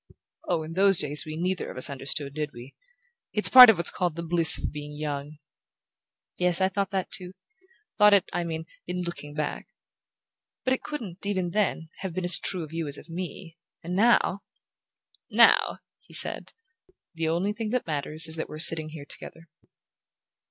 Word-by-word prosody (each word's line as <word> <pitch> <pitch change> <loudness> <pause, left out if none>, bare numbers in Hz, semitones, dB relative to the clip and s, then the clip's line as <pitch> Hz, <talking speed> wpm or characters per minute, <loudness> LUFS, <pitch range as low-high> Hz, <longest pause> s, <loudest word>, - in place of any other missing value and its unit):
"Oh, 170 -3 -1
in 160 +1 -9
those 195 +1 +4
days 150 0 +3
we 155 0 -7
neither 180 +2 -3
of - - -10
us 130 - +5
understood, 140 +1 -5
did 150 0 -5
we? 120 +3 -13 0.6
It's 210 - +3
part 250 -2 +10
of 225 - +4
what's 170 - +3
called 175 -3 -3
the 170 - -6
bliss 165 -1 +8
of - - -5
being 150 0 -9
young." 150 0 -6 1.0
"Yes, 180 -1 0
I 190 0 +1
thought 195 0 -3
that, 190 -2 -4
too: 180 -1 -7 0.7
thought 210 -1 +6
it, 195 - +1
I 175 - -2
mean, 160 -1 -6 0.2
in 180 0 -4
looking 150 -4 -8
back. 150 -1 -5 1.0
But 260 - 0
it 260 - -3
couldn't, 220 - -8
even 190 -3 -3
then, 180 -5 -2
have 190 -4 -7
been 185 - -3
as 175 - +5
true 180 -3 0
of 155 0 -11
you 165 -2 -4
as 145 - -1
of 165 - -14
me; 170 -1 -8 0.2
and 175 +2 -5
now 205 -2 +2 0.4
" - - -40 0.2
"Now," - - 0 0.2
he - - -6
said, - - +3 0.6
"the 165 -1 -3
only 180 +5 -1
thing 220 0 -5
that 250 +2 -2
matters 155 +1 -3
is 160 0 -4
that 160 - -5
we're 155 - -9
sitting 160 0 +2
here 155 -2 -11
together." 165 +3 -13
170 Hz, 185 wpm, -25 LUFS, 155-190 Hz, 1.0 s, part